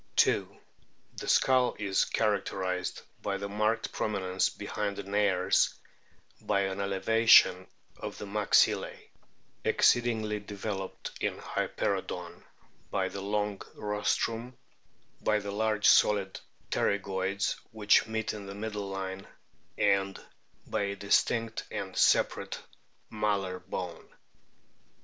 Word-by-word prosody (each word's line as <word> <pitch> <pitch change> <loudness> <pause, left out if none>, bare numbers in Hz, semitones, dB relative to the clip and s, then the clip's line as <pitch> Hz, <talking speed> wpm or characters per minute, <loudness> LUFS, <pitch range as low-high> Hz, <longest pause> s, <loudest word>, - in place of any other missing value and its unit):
2. - - +2 0.6
The - - -6
skull 130 -1 +3
is 100 -2 +1
characterised 95 -4 -1 0.2
by 100 - -2
the 100 +1 -4
marked 105 +3 0
prom 105 - -2
inence 95 -1 0
behind 105 -1 -3
the - - -4
nares, 100 -2 +2 0.7
by 100 - +1
an 95 0 -2
elevation 100 -1 +5 0.3
of - - -6
the - - -6
maxillae 105 0 +2 0.7
(exceedingly 110 -3 +2
developed 100 -1 -5
in - - -1
Hyperoodoii), - - -3 0.5
by 95 -1 0
the 100 - -6
long 105 0 -1
rostrum, 115 +3 -1 0.6
by 105 - +2
the 100 -1 -4
large 105 0 0
solid 100 -2 +4 0.3
pterygoids 100 0 0
which 105 0 +3
meet 110 -1 -2
in 105 -2 -8
the 100 - -7
middle 105 -1 -4
line, 95 0 -5 0.5
and 100 -1 +2 0.5
by - - -2
a 100 0 -1
distinct 110 +3 +1
and - - -5
separate - - +2 0.5
malar 100 -4 -1
bone. 90 -2 -6
100 Hz, 110 wpm, -30 LUFS, 95-105 Hz, 0.7 s, elevation